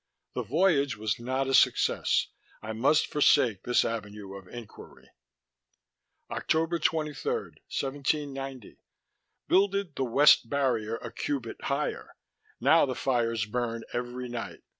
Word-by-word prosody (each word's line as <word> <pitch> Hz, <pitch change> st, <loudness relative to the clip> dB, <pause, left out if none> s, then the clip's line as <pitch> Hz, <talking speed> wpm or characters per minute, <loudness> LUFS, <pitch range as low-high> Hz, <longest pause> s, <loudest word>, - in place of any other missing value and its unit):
The -, -, -2 dB
Voyage 145 Hz, -, +2 dB
was 105 Hz, 0 st, -2 dB
not 130 Hz, +3 st, -1 dB
a 135 Hz, -, -2 dB
Succefs. -, -, +3 dB, 0.3 s
I 110 Hz, +1 st, -6 dB
must 135 Hz, +7 st, +3 dB
forsake 130 Hz, -8 st, +3 dB
this 125 Hz, -, +2 dB
avenue 105 Hz, -3 st, -5 dB
of 95 Hz, -2 st, -10 dB
Enquiry...._" 120 Hz, -1 st, -11 dB, 1.3 s
"_October 165 Hz, +1 st, 0 dB
23, 155 Hz, -3 st, -1 dB
1790. 135 Hz, -2 st, -4 dB, 0.7 s
Builded 200 Hz, -3 st, +2 dB
the 135 Hz, -, -1 dB
weft 130 Hz, -1 st, +5 dB
Barrier 120 Hz, -6 st, 0 dB
a -, -, -7 dB
cubit 135 Hz, -6 st, -4 dB
higher. 140 Hz, +2 st, -2 dB, 0.4 s
Now 165 Hz, -3 st, +5 dB
the 130 Hz, -, -3 dB
fires 115 Hz, -5 st, 0 dB
burn 115 Hz, +1 st, -3 dB
every 125 Hz, +1 st, -4 dB
night. 120 Hz, -1 st, -6 dB
130 Hz, 120 wpm, -28 LUFS, 115-145 Hz, 1.3 s, weft